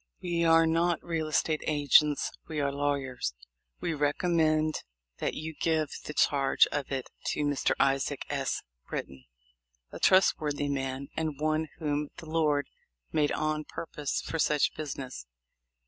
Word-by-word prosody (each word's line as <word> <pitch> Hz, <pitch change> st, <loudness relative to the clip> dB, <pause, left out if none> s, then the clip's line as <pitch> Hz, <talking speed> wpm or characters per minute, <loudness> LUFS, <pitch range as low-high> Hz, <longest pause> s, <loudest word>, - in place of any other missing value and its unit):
We 170 Hz, -1 st, -1 dB
are 165 Hz, 0 st, +6 dB
not 165 Hz, +1 st, +1 dB
real 165 Hz, -2 st, -2 dB
estate 155 Hz, 0 st, +1 dB
agents, 145 Hz, 0 st, +4 dB, 0.2 s
we 155 Hz, -2 st, -3 dB
are 140 Hz, -1 st, +1 dB
lawyers. 140 Hz, -, -1 dB, 0.4 s
We 170 Hz, -, -1 dB
recommend 155 Hz, +1 st, +1 dB, 0.4 s
that -, -, -1 dB
you 160 Hz, +1 st, -5 dB
give 160 Hz, -3 st, +2 dB, 0.2 s
the 150 Hz, -, -6 dB
charge 140 Hz, -2 st, +4 dB
of 145 Hz, -2 st, -3 dB
it 135 Hz, -2 st, -3 dB, 0.2 s
to -, -, 0 dB
Mr. 145 Hz, -1 st, +1 dB
Isaac 135 Hz, 0 st, +1 dB
S. -, -, -2 dB, 0.2 s
Britton, 65 Hz, -1 st, -6 dB, 0.7 s
a -, -, -8 dB
trustworthy 150 Hz, -6 st, +3 dB
man, 135 Hz, 0 st, -3 dB
and 155 Hz, -3 st, -2 dB
one 155 Hz, +1 st, +1 dB
whom 150 Hz, -2 st, -1 dB
the 175 Hz, -, -9 dB
Lord 155 Hz, -3 st, +2 dB, 0.5 s
made 150 Hz, -1 st, +2 dB
on 155 Hz, 0 st, -1 dB
purpose 150 Hz, -2 st, -4 dB
for 165 Hz, -, -3 dB
such 150 Hz, -1 st, +3 dB
business." 135 Hz, -, -6 dB
150 Hz, 140 wpm, -29 LUFS, 140-160 Hz, 0.7 s, are